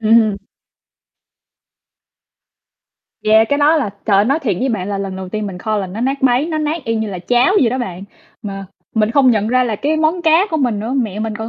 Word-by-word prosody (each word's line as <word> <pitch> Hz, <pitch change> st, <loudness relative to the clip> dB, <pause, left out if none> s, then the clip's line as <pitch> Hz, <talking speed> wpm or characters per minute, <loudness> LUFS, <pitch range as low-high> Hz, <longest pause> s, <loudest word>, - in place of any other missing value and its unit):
Ừm. 220 Hz, -2 st, +3 dB, 2.9 s
Yeah, 220 Hz, +1 st, +5 dB
cái 285 Hz, -, +1 dB
đó 300 Hz, +2 st, +4 dB
là, 270 Hz, -10 st, -1 dB, 0.2 s
trời 205 Hz, -3 st, +3 dB
ơi, 200 Hz, -, +4 dB
nói 275 Hz, +7 st, +1 dB
thiệt 215 Hz, -, -1 dB
với 265 Hz, -, 0 dB
bạn 200 Hz, -6 st, -2 dB
là 200 Hz, -1 st, -2 dB
lần 195 Hz, -1 st, -4 dB
đầu 190 Hz, -1 st, -7 dB
tiên 215 Hz, +1 st, -4 dB
mình 190 Hz, -3 st, -7 dB
kho 215 Hz, +3 st, -2 dB
là 200 Hz, -2 st, -2 dB
nó 190 Hz, +5 st, -7 dB
nát 270 Hz, +3 st, -1 dB
bấy, 255 Hz, +3 st, +3 dB
nó 320 Hz, -2 st, -2 dB
nát 305 Hz, +1 st, -2 dB
y 230 Hz, -, -1 dB
như 220 Hz, -1 st, -2 dB
là 185 Hz, -, -5 dB
cháo 245 Hz, -, +2 dB
vậy 235 Hz, -, +3 dB
đó 255 Hz, -, -2 dB
bạn, 190 Hz, -5 st, -5 dB, 0.4 s
mà 195 Hz, -2 st, -6 dB, 0.3 s
mình 215 Hz, -1 st, +2 dB
không 260 Hz, 0 st, +4 dB
nhận 215 Hz, -2 st, +1 dB
ra 255 Hz, +1 st, +2 dB
là 225 Hz, -3 st, -2 dB
cái 300 Hz, +8 st, -1 dB
món 315 Hz, +3 st, 0 dB
cá 330 Hz, +4 st, +4 dB
của 320 Hz, -, 0 dB
mình 245 Hz, -8 st, 0 dB
nữa, 225 Hz, +4 st, -4 dB
mẹ 215 Hz, -6 st, -2 dB
mình 220 Hz, -1 st, -3 dB
còn 220 Hz, +1 st, -5 dB
225 Hz, 235 wpm, -17 LUFS, 205-275 Hz, 2.9 s, Yeah